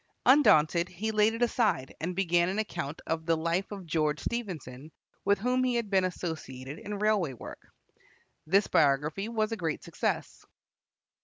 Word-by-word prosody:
Undaunted, 170 Hz, -, +5 dB
he 210 Hz, +5 st, -3 dB
laid 215 Hz, +1 st, +3 dB
it 235 Hz, -, 0 dB
aside 220 Hz, -, +1 dB
and 175 Hz, +3 st, -3 dB
began 175 Hz, -2 st, +2 dB
an 195 Hz, -, -2 dB
account 160 Hz, -9 st, -3 dB
of 160 Hz, 0 st, -3 dB
the 165 Hz, -1 st, +3 dB
life 170 Hz, +5 st, -1 dB
of 195 Hz, -3 st, -7 dB
George 155 Hz, -2 st, 0 dB
Stephenson, 160 Hz, -, -5 dB, 0.3 s
with 200 Hz, +1 st, +3 dB
whom 250 Hz, +5 st, +1 dB
he 250 Hz, -1 st, +1 dB
had 230 Hz, -4 st, -2 dB
been 190 Hz, -1 st, +3 dB
associated 155 Hz, -6 st, -5 dB
in 205 Hz, 0 st, -5 dB
railway 205 Hz, -8 st, +1 dB
work. 120 Hz, -, -11 dB, 0.8 s
This 195 Hz, +5 st, +4 dB
biography 150 Hz, +8 st, +1 dB
was 220 Hz, -1 st, -1 dB
a 225 Hz, -, -2 dB
great 165 Hz, -5 st, -3 dB
success. -, -, -3 dB
185 Hz, 160 wpm, -29 LUFS, 160-215 Hz, 0.8 s, Undaunted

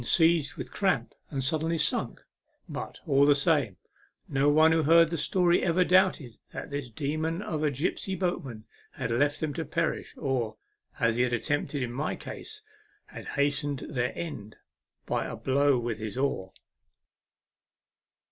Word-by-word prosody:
seized 165 Hz, +2 st, +3 dB
with 130 Hz, -2 st, -7 dB
cramp 130 Hz, -, 0 dB, 0.2 s
and 135 Hz, -2 st, -2 dB
suddenly 160 Hz, +3 st, 0 dB
sunk; 150 Hz, -, 0 dB, 0.4 s
but, -, -, -6 dB
all 140 Hz, -1 st, +4 dB
the 145 Hz, 0 st, +6 dB
same, 140 Hz, -, +1 dB, 0.5 s
no 140 Hz, +1 st, +2 dB
one 155 Hz, +2 st, +6 dB
who 160 Hz, 0 st, +3 dB
heard 165 Hz, +2 st, +5 dB
the -, -, 0 dB
story 175 Hz, +3 st, +2 dB
ever 180 Hz, +1 st, +3 dB
doubted 180 Hz, -, +2 dB
that -, -, -7 dB
this 140 Hz, -3 st, -4 dB
demon 155 Hz, +7 st, -2 dB
of 155 Hz, -6 st, -3 dB
a 150 Hz, -, +3 dB
gipsy 160 Hz, +7 st, -2 dB
boatman 135 Hz, -, -3 dB, 0.3 s
had 125 Hz, -4 st, -3 dB
left 145 Hz, +5 st, +1 dB
them 155 Hz, -2 st, -2 dB
to 165 Hz, -, -3 dB
perish, 170 Hz, 0 st, -2 dB
or, 125 Hz, -7 st, -1 dB, 0.4 s
as 115 Hz, 0 st, +2 dB
he -, -, +3 dB
had 125 Hz, -1 st, +1 dB
at 120 Hz, -, -1 dB
tempted 145 Hz, -1 st, -1 dB
in 120 Hz, -1 st, -4 dB
my 140 Hz, +5 st, -2 dB
case, 430 Hz, -1 st, -8 dB, 0.4 s
had -, -, -10 dB
hastened 145 Hz, -1 st, +1 dB
their 125 Hz, -1 st, 0 dB
end 110 Hz, -11 st, -6 dB, 0.5 s
by -, -, -1 dB
a -, -, -5 dB
blow 140 Hz, 0 st, +2 dB
with 120 Hz, -2 st, -3 dB
his 110 Hz, +2 st, -5 dB
oar. 115 Hz, -9 st, -1 dB
145 Hz, 160 wpm, -28 LUFS, 125-165 Hz, 0.5 s, the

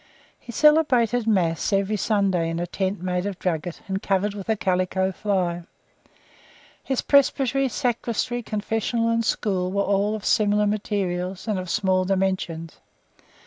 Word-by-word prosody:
He 235 Hz, -, -10 dB
celebrated 245 Hz, -6 st, +3 dB
Mass 175 Hz, -4 st, +1 dB
every 200 Hz, +1 st, +1 dB
Sunday 195 Hz, -5 st, +1 dB
in 165 Hz, 0 st, -3 dB
a 175 Hz, -, -1 dB
tent 190 Hz, +1 st, -3 dB
made 180 Hz, +1 st, -1 dB
of 200 Hz, -3 st, -5 dB
drugget, 170 Hz, -2 st, -3 dB
and 195 Hz, 0 st, -2 dB
covered 200 Hz, +1 st, 0 dB
with 200 Hz, 0 st, -8 dB
a 220 Hz, -, +3 dB
calico 190 Hz, -1 st, 0 dB
fly. 185 Hz, -3 st, -1 dB, 1.2 s
His 265 Hz, -2 st, -1 dB
presbytery, 275 Hz, -1 st, +3 dB
sacristy, 240 Hz, 0 st, -1 dB
confessional, 225 Hz, +1 st, -1 dB
and 230 Hz, 0 st, +1 dB
school 185 Hz, -5 st, -1 dB
were 200 Hz, +1 st, +1 dB
all 200 Hz, +2 st, +1 dB
of 210 Hz, -, -7 dB
similar 210 Hz, 0 st, +3 dB
materials, 195 Hz, -2 st, -2 dB
and 210 Hz, -3 st, 0 dB
of 185 Hz, -1 st, -6 dB
small 185 Hz, -2 st, +1 dB
dimensions. 185 Hz, -4 st, -2 dB
200 Hz, 145 wpm, -24 LUFS, 185-225 Hz, 1.2 s, celebrated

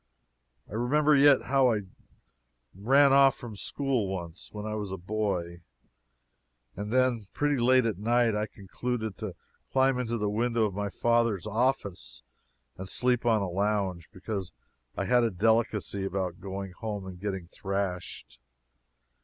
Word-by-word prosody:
I -, -, -13 dB
remember 145 Hz, +7 st, +3 dB
yet 140 Hz, 0 st, +6 dB
how 135 Hz, -2 st, +3 dB
I 105 Hz, -2 st, 0 dB, 0.9 s
ran 135 Hz, +8 st, +4 dB
off 135 Hz, -1 st, +6 dB
from 120 Hz, -5 st, -9 dB
school 130 Hz, 0 st, -1 dB
once, 90 Hz, -2 st, -6 dB
when 105 Hz, 0 st, -6 dB
I 110 Hz, -, -3 dB
was 105 Hz, -3 st, -4 dB
a 95 Hz, -, -4 dB
boy, 90 Hz, -3 st, -3 dB, 1.1 s
and 105 Hz, +2 st, -5 dB
then, 125 Hz, -4 st, +2 dB
pretty 145 Hz, -1 st, +1 dB
late 130 Hz, +1 st, +4 dB
at 105 Hz, -5 st, -1 dB
night, 120 Hz, +1 st, +2 dB, 0.2 s
concluded 110 Hz, +1 st, -4 dB
to 105 Hz, -5 st, -5 dB, 0.4 s
climb 130 Hz, -1 st, +3 dB
into 120 Hz, -1 st, -2 dB
the 105 Hz, -1 st, -1 dB
window 115 Hz, +2 st, +1 dB
of 105 Hz, -, -2 dB
my 100 Hz, +1 st, -2 dB
father's 115 Hz, -3 st, +1 dB
office 110 Hz, -3 st, -1 dB, 0.5 s
and 95 Hz, 0 st, -6 dB
sleep 125 Hz, +1 st, +1 dB
on 110 Hz, -3 st, +3 dB
a -, -, -2 dB
lounge, 95 Hz, -2 st, -1 dB
because 95 Hz, -1 st, -5 dB, 0.5 s
I -, -, -1 dB
had 125 Hz, -1 st, +4 dB
a 115 Hz, -, +2 dB
delicacy 110 Hz, 0 st, +1 dB
about 95 Hz, -2 st, -3 dB
going 95 Hz, 0 st, -5 dB
home 105 Hz, 0 st, -5 dB
and 90 Hz, -1 st, -9 dB
getting 95 Hz, -2 st, -4 dB
thrashed. 90 Hz, -7 st, -4 dB
110 Hz, 145 wpm, -28 LUFS, 95-125 Hz, 1.1 s, yet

